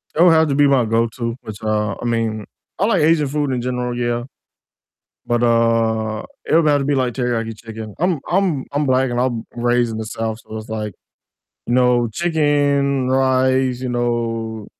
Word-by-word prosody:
It 165 - +5
would 175 -2 +7
have 160 -1 +4
to 140 - +1
be 145 0 +5
my 130 -4 +3
go-to, 115 +1 -1
which, 110 -2 -8
uh 105 -2 0
I - - -5
mean, 115 -2 -1 0.3
I 200 - +3
like 225 - +2
Asian 155 -2 +3
food 145 -1 -1
in 125 -2 -1
general, 125 -1 -2
yeah, 120 0 -1 1.0
but, 120 0 0
uh, 115 -2 +1 0.2
it - - +1
would 165 -2 +4
have 145 -1 +4
to 140 - -2
be 145 0 +1
like 130 -2 0
teriyaki 115 -2 -2
chicken, 110 -1 -9
I'm 175 -4 +1
I'm 175 -7 +1
I'm 145 +1 0
black 130 0 +2
and 120 - -1
I'm 120 -3 -1
raised 120 0 +1
in 110 - -5
the 110 - -4
South, 110 0 -4
so 110 - -9
it's 110 0 -9
like, 105 -3 -4 0.7
you 120 - 0
know, 125 -2 +3
chicken, 145 -4 +1
rice, 130 -1 +2
you 130 - -3
know, 115 -3 -2
120 Hz, 190 wpm, -19 LUFS, 115-140 Hz, 1.0 s, would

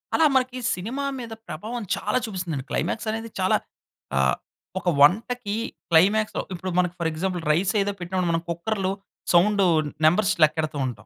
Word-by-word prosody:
అలా 320 - +5
మనకి 255 -1 +1 0.2
సినిమా 235 +10 -4 0.2
మీద 235 -2 -7 0.2
ప్రభావం 220 +9 -5
చాలా 210 +4 -1
చూపిస్తుందండి. 180 - -4
క్లైమాక్స్ 210 +7 -1
అనేది 225 +1 -4
చాలా 185 - +3 0.6
ఆహ్, 65 -1 +3 0.4
ఒక 180 -1 0
వంటకి 210 - +3 0.4
క్లైమాక్స్‌లో 200 +6 +4
ఇప్పుడు 185 +1 -4
మనకు 180 -1 +1
ఫర్ 165 -1 +1
ఎగ్జాంపుల్ 175 +2 -2
రైస్ 180 +7 +2
ఏదో 200 +1 0
పెట్టి 175 +1 -7 0.2
మనం 165 0 0
కుక్కర్‌లో 190 +3 -1 0.4
సౌండు 195 +3 +5 0.4
నంబర్స్ 180 +5 +4
లెక్కెడుతూ 155 -1 +1
ఉంటాం. 110 -4 -8
185 Hz, 145 wpm, -24 LUFS, 165-220 Hz, 0.6 s, అలా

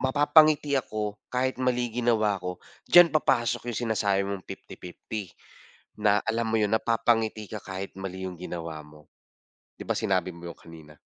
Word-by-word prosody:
mapapangiti 145 +2 +4
ako 105 -4 -4 0.2
kahit 130 +1 0
mali 125 -1 +1
yung 115 +2 -7
ginawa 110 -4 +2
ko. 90 0 -5 0.3
Diyan 175 -2 +8
papasok 120 -5 +1
yung 115 - -5
sinasabi 100 -3 +1
mong 100 -2 -5
50-50 95 +2 -8 0.7
na 105 -1 +4
alam 115 0 0
mo - - +3
'yon, 105 - +2
napapangiti 115 -2 +1
ka 110 -2 -5
kahit 95 0 -6
mali 95 -1 -6
yung 90 - -8
ginawa 85 -3 -6
mo. 75 0 -18 0.7
'Di - - -7
ba, - - +1
sinabi 95 -4 0
mo 85 0 -9
'yun - - -23
kanina? 80 -2 -14
105 Hz, 160 wpm, -27 LUFS, 95-120 Hz, 0.7 s, Diyan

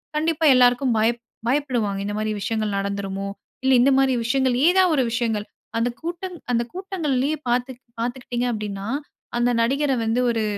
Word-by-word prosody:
கண்டிப்பா 320 +1 +1
எல்லாருக்கும் 245 0 +4
பயப் 230 +2 +1 0.3
பயப்படுவாங்க 245 -7 0
இந்த 205 - -3
மாதிரி 215 0 -1
விஷயங்கள் 215 0 -1
நடந்துருமோ. 195 0 -3 0.4
இல்ல 265 0 +4
இந்த 275 - +5
மாதிரி 270 -1 +3
விஷயங்கள், 260 +1 +2
ஏதாவது 365 -1 +4
ஒரு 265 - +3
விஷயங்கள். 225 -3 -1 0.3
அந்த 230 +2 +1
கூட்டம் 350 +2 -5 0.2
அந்த 235 -1 +2
கூட்டங்களிலேயே 310 -7 -1
பார்த்து 245 +2 +1 0.3
பார்த்தூக்கிட்டீங்க 245 0 -2
அப்படின்னா, 205 -3 -4 0.5
அந்த 240 +1 +2
நடிகரை 270 +3 +1
வந்து 225 +2 +1
ஒரு 225 -1 0
245 Hz, 150 wpm, -23 LUFS, 220-275 Hz, 0.5 s, இந்த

